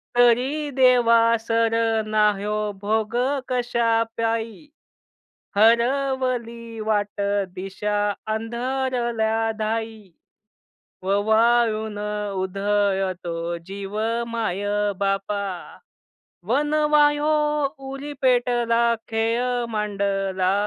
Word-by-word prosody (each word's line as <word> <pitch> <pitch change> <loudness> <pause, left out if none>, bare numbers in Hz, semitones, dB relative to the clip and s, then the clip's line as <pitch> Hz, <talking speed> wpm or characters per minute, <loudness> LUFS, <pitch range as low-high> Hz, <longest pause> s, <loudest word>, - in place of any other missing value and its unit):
तरी 250 +5 +3
देवा 245 -3 +5 0.2
सर 225 0 +1 0.3
ना 215 -1 +3
हयो 210 +1 -2 0.2
भोग 220 +2 -1 0.3
कशा 235 -2 +1
पायी? 230 +4 -2 0.9
हरवली 235 0 +1
वाट 205 -1 0 0.3
दिशा 195 +2 -3 0.4
अंधरल्या 235 -1 -1
धाई, 220 -2 -3 0.9
ववाळून 220 +2 +2 0.4
उधळतो 195 -2 -1 0.3
जीव 200 +1 -6 0.3
माय-बापा, 205 -2 -1 1.1
वनवा 300 +2 +3
हयो 295 +1 0 0.6
उरी 280 +2 -6
पेटला 240 -2 +2 0.2
खेळ 235 +2 0
मांडला, 195 -3 0
225 Hz, 65 wpm, -23 LUFS, 205-245 Hz, 1.1 s, देवा